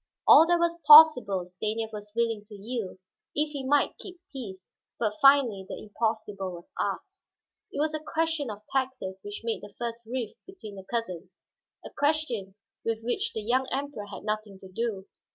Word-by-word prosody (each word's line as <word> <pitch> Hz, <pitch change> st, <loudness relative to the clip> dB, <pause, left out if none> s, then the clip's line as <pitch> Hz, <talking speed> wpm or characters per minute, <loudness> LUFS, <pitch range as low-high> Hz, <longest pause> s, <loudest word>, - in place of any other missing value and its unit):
All 325 Hz, -, +9 dB
that 345 Hz, 0 st, +4 dB
was 340 Hz, 0 st, 0 dB
possible 250 Hz, -, +8 dB
Stanief 215 Hz, +5 st, -3 dB
was 210 Hz, 0 st, -8 dB
willing 230 Hz, -3 st, 0 dB
to 210 Hz, 0 st, -12 dB
yield, 210 Hz, -1 st, -5 dB, 0.4 s
if 300 Hz, +1 st, +1 dB
he 280 Hz, -2 st, -5 dB
might 280 Hz, +2 st, +1 dB
keep 365 Hz, -2 st, -9 dB
peace, 195 Hz, -9 st, -8 dB, 0.3 s
but 215 Hz, -3 st, 0 dB
finally 275 Hz, -8 st, +5 dB
the -, -, -5 dB
impossible 210 Hz, -3 st, -3 dB
was 170 Hz, 0 st, -12 dB
asked. -, -, -3 dB, 0.5 s
It -, -, -5 dB
was 310 Hz, +1 st, +1 dB
a 310 Hz, -, -2 dB
question 315 Hz, -2 st, -1 dB
of 210 Hz, 0 st, -8 dB
taxes 255 Hz, -8 st, -2 dB
which 205 Hz, 0 st, -7 dB
made 230 Hz, -1 st, -2 dB
the 205 Hz, -1 st, -12 dB
first 235 Hz, -1 st, -5 dB
rift 240 Hz, -2 st, -5 dB
between 370 Hz, -, -10 dB
the 190 Hz, -, -10 dB
cousins, 185 Hz, -6 st, -5 dB, 0.4 s
a -, -, -8 dB
question 270 Hz, -11 st, 0 dB, 0.3 s
with 225 Hz, 0 st, -2 dB
which 400 Hz, -, -1 dB
the 215 Hz, -, -4 dB
young 255 Hz, +4 st, +1 dB
Emperor 275 Hz, -6 st, -4 dB
had 205 Hz, -, -9 dB
nothing 215 Hz, -2 st, -3 dB
to 190 Hz, -, -12 dB
do. 200 Hz, -1 st, -3 dB
230 Hz, 175 wpm, -27 LUFS, 205-280 Hz, 0.5 s, All